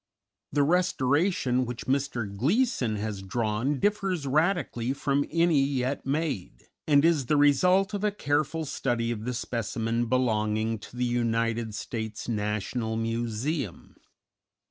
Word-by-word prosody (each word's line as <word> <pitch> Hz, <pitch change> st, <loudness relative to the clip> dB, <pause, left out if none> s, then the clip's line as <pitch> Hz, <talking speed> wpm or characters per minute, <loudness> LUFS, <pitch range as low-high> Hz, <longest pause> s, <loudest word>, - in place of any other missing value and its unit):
_] -, -, -63 dB, 0.5 s
The 145 Hz, 0 st, +3 dB
restoration 145 Hz, -4 st, +2 dB
which 120 Hz, -1 st, -5 dB
Mr. 130 Hz, -7 st, -1 dB
Gleeson 140 Hz, -, +1 dB
has 105 Hz, -1 st, -4 dB
drawn 115 Hz, +7 st, -1 dB
differs 195 Hz, -6 st, 0 dB
radically 145 Hz, -5 st, +1 dB
from 140 Hz, 0 st, 0 dB
any 165 Hz, -3 st, +3 dB
yet 135 Hz, 0 st, -1 dB
made, 140 Hz, -, -2 dB, 0.2 s
and 145 Hz, 0 st, +5 dB
is 155 Hz, -7 st, +2 dB
the 150 Hz, -, +3 dB
result 180 Hz, +8 st, +4 dB
of 205 Hz, 0 st, -3 dB
a 210 Hz, -, +3 dB
careful 155 Hz, -4 st, -1 dB
study 120 Hz, -4 st, -1 dB
of 110 Hz, -1 st, -4 dB
the 125 Hz, -, -2 dB
specimen 115 Hz, 0 st, -2 dB
belonging 110 Hz, -3 st, +1 dB
to 110 Hz, -, -12 dB
the 125 Hz, -, +1 dB
United 115 Hz, -2 st, 0 dB
States 110 Hz, -2 st, -5 dB
National 110 Hz, +1 st, -2 dB
Museum. 115 Hz, -, -3 dB
125 Hz, 130 wpm, -27 LUFS, 115-150 Hz, 0.5 s, and